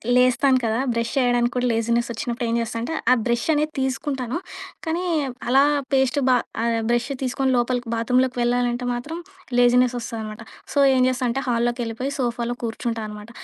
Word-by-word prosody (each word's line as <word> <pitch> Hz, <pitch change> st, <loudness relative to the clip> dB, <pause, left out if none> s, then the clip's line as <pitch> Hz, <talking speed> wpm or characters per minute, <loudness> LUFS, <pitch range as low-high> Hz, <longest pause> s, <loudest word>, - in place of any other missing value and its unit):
లేస్తాను 255 Hz, +2 st, +4 dB
కదా! 225 Hz, +1 st, 0 dB
బ్రెష్ 230 Hz, 0 st, -1 dB
చేయడానికి 245 Hz, -1 st, +2 dB
కూడా 250 Hz, 0 st, +1 dB
లేజీనెసొచ్చినప్పుడు 235 Hz, +2 st, -1 dB
ఏం 230 Hz, -, +1 dB
జేస్తానంటే. 230 Hz, +6 st, -3 dB, 0.2 s
ఆ -, -, +9 dB
బ్రెషనేది 295 Hz, +6 st, +1 dB
తీసుకుంటాను. 265 Hz, 0 st, -2 dB, 0.5 s
కాని, 330 Hz, +3 st, -1 dB, 0.4 s
అలా 270 Hz, +3 st, +5 dB, 0.3 s
పేస్ట్ 265 Hz, +1 st, +3 dB
బా 250 Hz, -, +6 dB, 0.3 s
ఆహ్, 230 Hz, -1 st, +1 dB
బ్రెష్ 240 Hz, +2 st, +1 dB
తీసుకొని 265 Hz, +1 st, 0 dB
లోపలికి, 245 Hz, 0 st, 0 dB
బాత్రూమ్‌లోకి 250 Hz, +2 st, +1 dB
వెళ్ళాలంటే 245 Hz, 0 st, 0 dB
మాత్రం 295 Hz, +8 st, -5 dB, 0.4 s
లేజీనెసోస్తదనమాట. 240 Hz, -3 st, +1 dB, 0.3 s
సో 285 Hz, -, +2 dB, 0.2 s
ఏం 255 Hz, -, +3 dB
జేస్తాంటే 255 Hz, 0 st, -1 dB
హాలులోకెళ్ళిపోయి, 240 Hz, +2 st, -1 dB
సోఫాలో 240 Hz, -1 st, -1 dB
కూర్చుంటానమాట. 225 Hz, -2 st, -4 dB
245 Hz, 130 wpm, -23 LUFS, 235-255 Hz, 0.5 s, ఆ